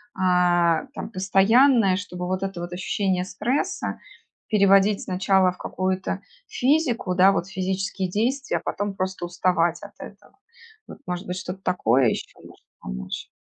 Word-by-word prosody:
а, 180 - +2
там - - -5
постоянное, 195 +3 +4
чтобы 180 -2 -6
вот 185 +1 -2
это 195 -2 -4
вот 175 0 -6
ощущение 185 0 -1
стресса 250 +8 -2 0.5
переводить 200 -1 +4
сначала 185 0 +2
в 180 - -15
какую-то 185 +1 -3 0.3
физику, 250 - +1
да, 190 +2 +6
вот 180 -2 -1
физические 190 0 -2
действия, 250 +8 -1
а - - -6
потом 205 0 -3
просто 185 -1 -3
уставать 175 -1 +1
от 205 - -9
этого. 205 - -13 0.5
Вот - - -10
может 180 +2 -4
быть 180 0 -4
что-то 185 +1 -6
такое 130 -7 +2
ещё - - -4
может - - -16 0.2
помочь? 60 +1 -6
190 Hz, 145 wpm, -24 LUFS, 180-200 Hz, 0.5 s, да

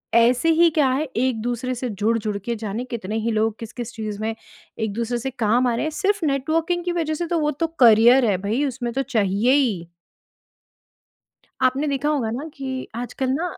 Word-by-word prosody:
ऐसे 245 +6 +4
ही 340 - +7
क्या 295 -4 +3
है 275 +4 0
एक-दूसरे 245 +1 -1
से 245 0 -3
जुड़-जुड़ 215 0 -1
के 235 - -1
जाने 215 +1 -4
कितने 215 -3 -4
ही 230 +1 -1
लोग 220 0 0
किस-किस 235 +1 -7
चीज़ 215 -2 -5
में 225 0 -2 0.4
एक-दूसरे 230 +3 -2
से 265 +3 -3
काम 245 +1 +2
आ 240 - +1
रहे 235 - -1
हैं 310 - 0
सिर्फ़ 400 +2 0
नेटवर्किंग 320 +5 0
की 355 - 0
वज़ह 320 -2 -1
से। 345 +2 -3
तो 335 0 0
वो 300 -1 +1
तो 330 +3 -1
करियर 240 +2 +7
है 200 -4 +2
भई 225 +8 0
उसमें 240 -3 -3
तो 270 - 0
चाहिए 220 0 +1
ही। 215 -12 +1 1.7
आपने 260 +3 +2
देखा 280 +1 -1
होगा 275 -7 0
ना 275 +8 -4
कि 260 -1 -5
आजकल 250 +2 -3
ना 315 +6 -1
245 Hz, 190 wpm, -22 LUFS, 225-280 Hz, 1.7 s, ही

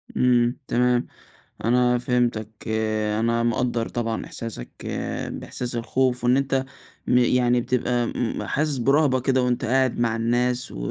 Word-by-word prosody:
إمم، 120 0 +3
تمام، 125 0 +2 0.6
أنا 125 +1 +3
فهمتك 120 -3 0 0.7
أنا 115 +1 +1
مقدّر 120 0 0
طبعًا 115 -2 -3
إحساسك 115 - -7 0.2
آآ - - -3
بإحساس 125 -1 -4
الخوف، 125 +1 0
وإن 125 +1 +4
أنت 135 -1 0 0.4
م 125 - +4
يعني 125 0 +3
بتبقى 120 -1 0
م 120 -2 -2
حاسس 150 -2 0
برهبة 135 +1 +3
كده 130 0 +2
وأنت 125 -1 0
قاعد 130 +1 +1
مع 115 -1 +1
الناس 120 +2 0
و - - -9
125 Hz, 140 wpm, -24 LUFS, 120-125 Hz, 0.7 s, وإن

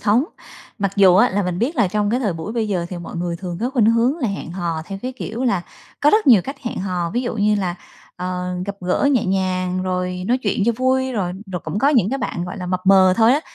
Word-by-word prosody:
thống, 225 +6 +3 0.5
mặc 195 -1 0
dù 190 -3 +6
á 240 +6 +5
là 200 +2 0
mình 180 -1 -2
biết 280 +8 -1
là 230 -7 +3
trong 205 +1 0
cái 245 +3 +1
thời 210 -7 0
buổi 165 +6 -6
bây 225 -3 -1
giờ 180 -4 -1
thì 180 - -6
mọi 170 0 -8
người 170 0 -2
thường 175 -1 -6
có 245 +3 -1
khuynh 245 -6 +3
hướng 235 +5 +2
là 245 -7 0
hẹn 195 -4 -5
hò 170 -3 -3
theo, 195 -1 -6
cái 255 +1 -3
kiểu 235 +1 -4
là, 195 -8 +1 0.4
có 295 - +5
rất 430 +4 +3
nhiều 230 -9 +7
cách 275 +6 -6
hẹn 235 - -4
hò, 180 -3 -2
ví 240 +6 -1
dụ 240 -2 -3
như 210 0 +2
là, 185 -4 -1 0.4
ờ, 180 0 -3
gặp 200 0 -4
gỡ 180 +10 +1
nhẹ 250 - +2
nhàng 185 -1 0
rồi 180 0 -2
nói 245 +4 +2
chuyện 200 -1 0
cho 235 - +4
vui, 260 +1 +1
rồi 185 -6 -1 0.2
rồi 180 - -3
cũng 205 - -3
có 275 - +3
những 235 -9 +3
cái 270 - -1
bạn, 175 - -3
gọi 180 +4 -6
là, 180 - -5
mập 185 0 -1
mờ 190 -1 +6
thôi 230 +1 +5
á, 290 - +2
200 Hz, 270 wpm, -20 LUFS, 180-240 Hz, 0.5 s, nhiều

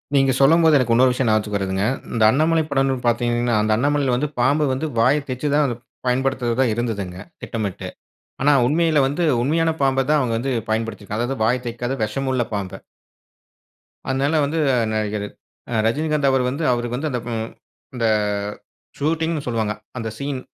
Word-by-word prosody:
நீங்க 135 -1 +4
சொல்லும்போது 160 +3 +5
எனக்கு 120 -3 +1
இன்னொரு 125 +2 +5
விஷயம் 125 0 -1
ஞாபகத்துக்கு 105 -1 +1
வருதுங்க. 95 0 -2 0.3
இந்த 115 -2 +1
அண்ணாமலை 160 +3 +2
படம்னு 135 -1 +2
பார்த்தீங்கன்னா 120 0 +1
அந்த 110 0 0
அண்ணாமலையில 140 +1 +1
வந்து 145 +5 0
பாம்பு 145 +5 +3
வந்து 155 +5 -2
வாய 145 +6 +4
தெச்சு 130 +4 -3
தான் 140 -5 +2 0.3
பயன்படுத்துவதா 130 -1 +1
இருந்ததுங்க, 100 -6 -3 0.2
திட்டமிட்டு 105 -5 -4 0.5
ஆனா 145 - +4
உண்மையில 160 +2 +2
வந்து 150 +6 -1 0.2
உண்மையான 165 +4 +1
பாம்ப 135 -1 +2
தான் 150 0 +4
அவங்க 120 -3 0
வந்து 135 +3 -2 0.2
பயன்படுத்திருக்காங்க. 110 -1 -3
அதாவது 130 -3 -3
வாய 120 +3 +3
தைக்காத 120 +2 -3
விஷமுள்ள 130 +3 -1
பாம்ப. 100 -2 -4 1.4
அதனால 135 +4 0
வந்து 160 +3 -2 0.3
நடிகர் 105 -1 -2 0.5
அ - - -2
ரஜினிகாந்த் 150 +3 +1
அவர் 130 -1 +2
வந்து, 140 +5 -3
அவருக்கு 120 0 -2
வந்து 155 +2 -2
அந்த 125 - -1
ம் 110 0 -3 0.5
இந்த 115 -2 -1 0.9
ஷூட்டிங்ன்னு 160 0 -1
சொல்வாங்க. 110 -3 -1 0.3
அந்த 115 -1 -3
சீன் 140 -1 -3
130 Hz, 150 wpm, -21 LUFS, 115-145 Hz, 1.4 s, சொல்லும்போது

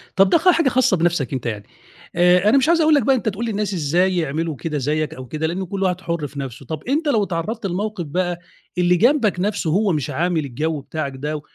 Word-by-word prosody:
طَب 195 0 +5
ده - - +5
خ 365 +4 +3
حاجة 330 -6 +4
خاصة 245 -8 +2
بنَفْسك 160 -5 0
أنت 130 -2 -4
يعني 105 -3 -3 0.5
آآ 180 +3 +4
أنا 275 - +5
مش 270 +4 +2
عايز 335 -1 +4
أقول 310 0 +4
لك 280 - +3
بقى 270 +4 +3
أنت 230 -3 -1
تقول 220 +4 -4
للناس 210 -3 -2
إزاي 180 +3 +1
يعملوا 160 0 -2
كده 150 +4 -4
زيّك 150 +2 -1
أو 130 -4 -9
كده، 155 +4 -2
لأن 185 +3 -3
كل 195 +2 -3
واحد 180 -1 0
حُر 170 -4 -3
في 140 +1 -9
نَفْسه. 135 -1 -7
طَب 155 +3 -6
أنت 295 +5 -1
لو 220 -7 +2
اتعرّضت 195 +5 -3
لموقف 195 -1 -3
بقى 175 +3 -2 0.4
اللي 180 0 +3
جنبك 235 - +2
نَفْسه 200 -3 -1
هو 200 +4 +2
مش 150 -1 -2
عامل 160 +1 0
الجَو 150 +3 -3
بتاعك 140 -1 -4
ده 150 +3 -4
175 Hz, 235 wpm, -21 LUFS, 155-210 Hz, 0.5 s, طَب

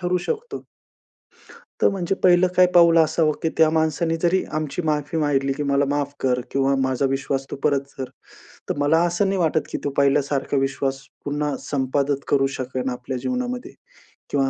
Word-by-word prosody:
ठरवू 180 +1 0
शकतो. 475 +2 -4 1.2
तर - - +5
म्हणजे 195 -1 -2
पहिलं 180 0 +5
काय 185 - +7
पाऊल 170 -1 +7
असावं, 160 -1 +3
की 160 - +1
त्या 160 -1 +5
माणसाने 160 +1 +1
जरी 185 +2 +2
आमची 155 +3 -2
माफी 150 +1 -1
मागितली, 135 -3 +1
की 145 +1 -4
"मला 140 0 +2
माफ 145 0 -1
कर 125 -1 +1
किंवा 135 0 +2
माझा 130 +1 0
विश्वास 135 0 -2
तू - - -3
परत 140 -1 +1
कर." 130 -1 -5 0.6
तर - - -1
मला 145 +3 +3
असं 175 +4 0
नाही 195 -1 0
वाटत, 160 -2 +2
की - - -3
तो 145 - 0
पहिल्यासारखा 140 0 +1
विश्वास 135 0 -1 0.2
पुन्हा 145 0 -2
संपादित 140 0 -1
करू 135 -1 +3
शकेन 130 0 -3
आपल्या 125 +1 -5
जीवनामध्ये 250 - -3 0.6
किंवा 135 -2 +1
145 Hz, 170 wpm, -22 LUFS, 135-165 Hz, 1.2 s, काय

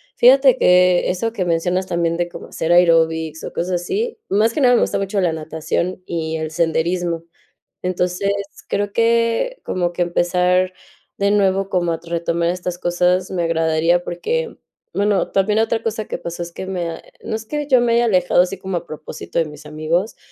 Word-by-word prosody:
fíjate 260 +1 +6
que 180 -2 +4
eso 225 +5 -1
que 195 - -1
mencionas 175 +2 0
también 170 -1 0
de 175 0 -1
cómo - - -10
hacer 165 +1 -2
aeróbics 160 -2 +3
o - - -5
cosas 175 0 -2
así, 445 - -3
más 215 +4 +2
que 295 - -1
nada 245 -1 +5
me - - +3
gusta - - 0
mucho 195 +1 -1
la 175 -4 +1
natación 160 +3 -3
y 160 -1 -3
el 155 0 -3
senderismo, 170 +1 0 0.6
entonces, 180 +2 -1 0.4
creo 205 0 -1
que 230 - +1
como 175 -1 -1
que 175 - -1
empezar 180 +1 +1 0.5
de 200 0 +2
nuevo 195 -1 +2
como 175 -3 0
a 165 - -4
retomar 170 0 -1
estas 180 0 -3
cosas 180 +1 +1
me 180 -2 -1
agradaría, 165 +1 +2
porque, 470 - -3 0.4
bueno, 205 -1 +1
también 210 +2 +2
otra 225 0 +1
cosa 220 -1 -2
que - - -4
pasó 170 0 -6
es 170 0 -7
que 190 - -7
me 180 -3 -3
ha 165 - -8 0.2
no - - -4
es 220 0 -8
que 295 +2 -3
yo 260 -3 +4
me 235 -1 +2
haya 235 +1 +3
alejado 180 -4 +3
así 180 +1 -3
como 190 -1 -4
a 175 - -13
propósito 155 +2 -6
de 165 - +3
mis 150 0 -11
amigos, 155 +7 -1
180 Hz, 190 wpm, -20 LUFS, 170-205 Hz, 0.6 s, fíjate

